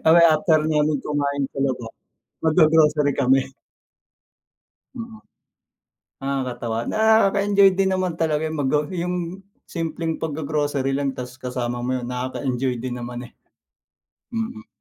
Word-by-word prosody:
Kasi 165 +2 +7
after 155 -1 +3
namin 150 -1 +2
kumain 140 -1 -1
sa 135 - -5
labas, 125 -4 -2 0.5
mag-gro-grocery 155 -2 +4
kami. 135 0 +3 1.5
Mm 230 -2 -8 1.0
Nakakatawa. 125 -4 -2
Nakaka-enjoy 200 -2 +4
din 190 -1 +3
naman 180 -3 -2
talaga 155 -1 +1
eh 155 - -2
mag-go 150 -1 +1
yung 180 0 -3 0.2
simpleng 165 -1 -3
pag-gro-grocery 145 -3 -1
lang 135 -1 -1
tas 125 +1 -8
kasama 125 -2 -3
mo 130 +1 -1
yun, 125 - -3
nakaka-enjoy 130 0 -2
din 125 +1 -5
naman 120 +1 -6
eh. 120 - -12 1.0
Mm. 225 0 -4
150 Hz, 120 wpm, -23 LUFS, 130-170 Hz, 1.5 s, Kasi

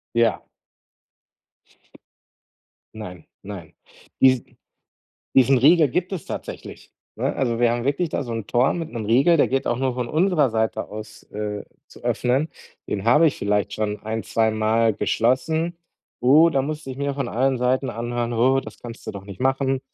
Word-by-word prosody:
Ja. 115 -2 +2 2.5
Nein, 90 -6 -9 0.2
nein. 95 -5 -9 0.5
Diesen 130 -2 +3 0.8
diesen 135 0 +5
Riegel 155 +4 +6
gibt 180 +8 -2
es 190 -4 -5
tatsächlich, - - -8 0.2
ne? - - -1
Also, 120 -3 0
wir 120 -1 +4
haben 120 0 -2
wirklich 145 +5 0
da 145 - -2
so 120 -3 -5
'n 115 -2 -4
Tor 125 +3 +2
mit 165 -2 -4
'nem 115 -3 -4
Riegel, 135 +10 +4
der - - +4
geht 135 0 -1
auch 120 - 0
nur 130 0 0
von 120 -1 -3
unserer 160 -4 +2
Seite 110 0 -1
aus, 110 +1 -9
äh, 105 -1 -4 0.2
zu - - -16
öffnen. 130 +6 0 0.4
Den 100 0 -3
habe 150 +8 +6
ich 145 - -2
vielleicht 105 0 0
schon 105 -1 -2
ein 110 0 -3
zweimal 110 0 +2
geschlossen. 160 +12 0 0.4
Oh, 150 +7 +6
da 135 -4 +1
musste 150 0 -5
ich 130 - -9
mir 140 0 -1
von 135 -3 -3
allen 130 +3 +1
Seiten 130 +2 +1
anhören: 120 0 -3
„Oh, 130 +3 +3
das - - -11
kannst 115 -1 -10
du - - -2
doch 100 -1 -8
nicht 100 -1 -10
machen. 135 +1 +1
125 Hz, 170 wpm, -23 LUFS, 110-140 Hz, 2.5 s, Riegel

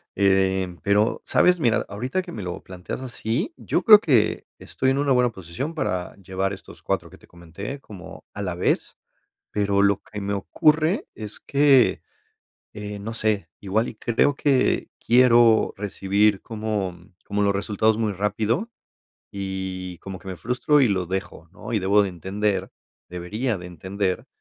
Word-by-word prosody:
Eh, 95 -2 +2
pero, 105 +2 +2
¿sabes? 180 -1 +4
Mira, 115 -3 +2
ahorita 125 - -2
que 180 - -10
me 105 - -6
lo 90 -1 -5
planteas 90 +4 -7
así, 125 - -3
yo - - -1
creo 210 -2 +10
que 125 - +2
estoy 130 - -1
en 135 - 0
una 140 -2 +2
buena 125 -1 +3
posición 95 - -6
para 90 - -2
llevar 95 0 -2
estos 95 - -12
4 - - -2
que - - -15
te - - -21
comenté 95 - -8
como 100 -8 -12
a 105 - -6
la 90 -3 -3
vez, 90 - -1 0.5
pero 100 -1 +1
lo 100 -1 +2
que 105 -1 -8
me 100 +1 -2
ocurre 155 - +2
es 110 -1 -7
que, 140 -8 +4 0.7
eh 105 -1 -6
no 110 +3 -5
sé, 105 -6 0
igual 105 +4 0
y - - -7
creo 120 +6 +1
que 135 -3 +1
quiero 120 -2 +5
recibir 100 0 +1
como 105 -5 -3 0.3
como 105 0 -1
los 100 0 +2
resultados 105 +2 +1
muy 110 -2 0
rápido, 105 - -1 0.6
y 95 -2 -5
como 95 -1 -8
que 95 - -11
me 95 - -5
frustro 125 - +2
y 125 - +4
los 95 -3 -1
dejo, 95 -3 -5
¿no? - - -8
Y 110 - +2
debo 100 +2 +4
de 100 - -1
entender, 95 +2 -2 0.4
debería 105 +7 -3
de 90 - -9
entender 95 +2 -3
105 Hz, 165 wpm, -24 LUFS, 95-120 Hz, 0.7 s, creo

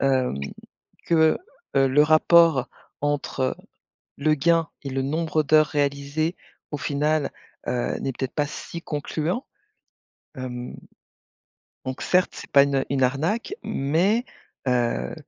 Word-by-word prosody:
Hem, 130 - +1 0.7
que, 160 -2 +4 0.4
heu, 135 0 +5
le 145 +3 +5
rapport 155 -3 +5 0.3
entre 140 -3 -1 0.6
le 155 +2 +2
gain 165 +2 +2
et 140 - -4
le 135 0 -1
nombre 155 +2 0
d'heures 155 +1 +5
réalisées 145 +3 -1 0.4
au 150 - -2
final, 150 +2 0 0.4
heu, 125 -1 -1
n'est 135 - -2
peut-être 130 +1 -4
pas 150 -2 +1
si 170 +3 -7
concluant. 160 - -3 0.9
Hem, 125 -1 -6 1.1
donc 130 0 -4
certes, 185 0 +2
c'est - - -9
pas 140 - +7
une 140 -1 0
une 135 -1 +1
arnaque, 160 - 0
mais 180 - +1 0.4
heu 120 -2 0
145 Hz, 120 wpm, -24 LUFS, 135-160 Hz, 1.1 s, pas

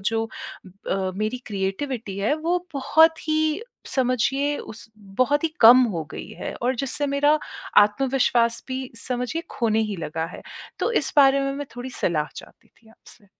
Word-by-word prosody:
जो 225 +3 -1 0.4
ब - - -12 0.2
अ, 190 -1 0
मेरी 215 +4 -1
क्रिएटिविटी 200 +1 -3
है। 215 +9 +1
वो 335 +3 0 0.2
बहुत 320 +4 +3
ही 310 +5 +1 0.3
समझिए 270 +3 +1
उस 225 +1 -9
बहुत 255 +10 0
ही - - +3
कम 245 +3 +9
हो 160 -2 -3
गई - - -7
है - - -4
और 255 +2 +1
जिससे 275 +3 -1
मेरा 290 +2 +3 0.4
आत्मविश्वास 235 +1 +2
भी 260 0 -4 0.2
समझिए 250 +7 -2
खोने 220 -2 +1
ही 200 - -4
लगा 160 0 -4
है। - - -12 0.4
तो 470 - 0
इस - - -2
बारे 275 -1 +6
में 275 0 -1
मैं 290 0 -5
थोड़ी 250 +1 -6
सलाह 155 -9 -1
चाहती - - -13
थी 225 - -26
आपसे? 220 -1 -16
255 Hz, 165 wpm, -23 LUFS, 215-285 Hz, 0.4 s, कम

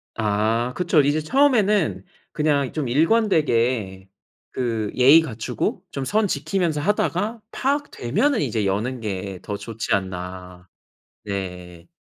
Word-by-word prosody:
아. 110 +3 0
그쵸. 170 -4 +3
이제 145 +2 +1
처음에는 210 - +2 0.3
그냥 145 -3 +1
좀 150 -5 -2
일관되게 125 - +1 0.4
그 115 -5 -2
예의 140 +6 +7
갖추고 115 -8 -3
좀 135 -1 -4
선 210 +9 +1
지키면서 165 0 -1
하다가 210 +4 0
'파악되면은 275 - 0
이제 110 -3 -1
여는 110 +6 -1
게 95 -3 -4
더 100 -1 -5
좋지 115 0 -4
않나.' 90 -1 -4 0.6
네. 90 -4 -6
125 Hz, 235 characters per minute, -22 LUFS, 100-165 Hz, 0.6 s, 예의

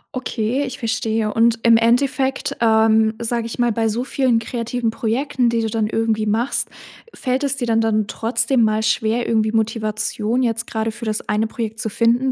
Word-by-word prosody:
Okay, 255 +1 -1
ich 255 - -7
verstehe, 225 -2 -1
und 230 0 +3
im 230 -1 +6
Endeffekt, 265 +3 +1
ähm, 220 -1 +4
sage 235 0 -2
ich 230 - -7
mal, 240 -1 +2
bei 225 0 0
so 235 +4 -2
vielen 260 -3 +1
kreativen 230 0 -2
Projekten, 240 +2 0
die 230 0 0
du 225 - -1
dann 220 -1 0
irgendwie 220 -1 0
machst, 225 +5 0 0.5
fällt 260 +2 -1
es 280 -1 +1
dir 245 - -2
dann 225 -1 +2
dann 215 -1 +1
trotzdem 240 +3 0
mal 215 0 +1
schwer, 225 +1 0
irgendwie 220 -1 +1
Motivation 220 +1 -1
jetzt 230 0 -1
grade 220 0 -2
für 235 +1 -8
das 215 -1 -2
eine 210 +1 +1
Projekt 225 -1 -5
zu 220 - -2
finden, 240 +4 +2
225 Hz, 185 wpm, -20 LUFS, 220-240 Hz, 0.5 s, im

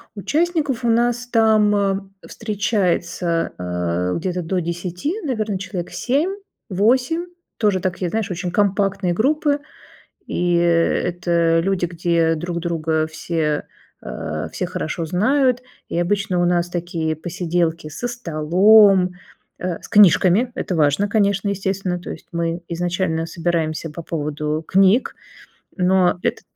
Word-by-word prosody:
Участников 290 - 0
у 235 - +2
нас 240 +1 +1
там, 220 -3 +3
э, 195 -1 +1 0.3
встречается, 180 -5 -1
а, 90 0 -2
где-то 180 +1 -2
до 180 +2 -1
10 175 - -3
наверно 220 - -2
человек 185 -2 -5
7-8, 275 - 0 0.3
тоже 205 -4 +2
такие 180 -1 -2
знаешь 220 0 -2
очень 180 0 -3
компактные 195 -2 +1
группы, 285 - +1 0.7
и 175 0 0
это 170 0 +2
люди 180 -1 0
где 170 -1 +1
друг 170 +1 -4
друга 160 -2 -1
все, 155 -1 -2 0.4
а, - - -5
все - - -3
хорошо 165 +2 -3
знают 250 - +2 0.3
и 170 - -2
обычно 185 0 0
у - - +3
нас 175 0 +1
такие 165 -2 -2
посиделки 165 -1 -2
со 155 +11 -5
столом, 190 -1 +4 0.4
э, 180 -2 -3
с - - -11
книжками- 205 +4 +5
это 180 - -3
важно, 155 +6 +2
конечно, 200 -1 +1
естественно, 195 -2 -2
то 175 - -9
есть - - -9
мы 170 0 -2
изначально 170 -1 -1
собираемся 165 -2 -2
по 165 +3 -8
поводу 150 -1 -3
книг. 195 +6 +3 0.7
Но 180 -1 +3
это - - -1
180 Hz, 125 wpm, -21 LUFS, 170-210 Hz, 0.7 s, книжками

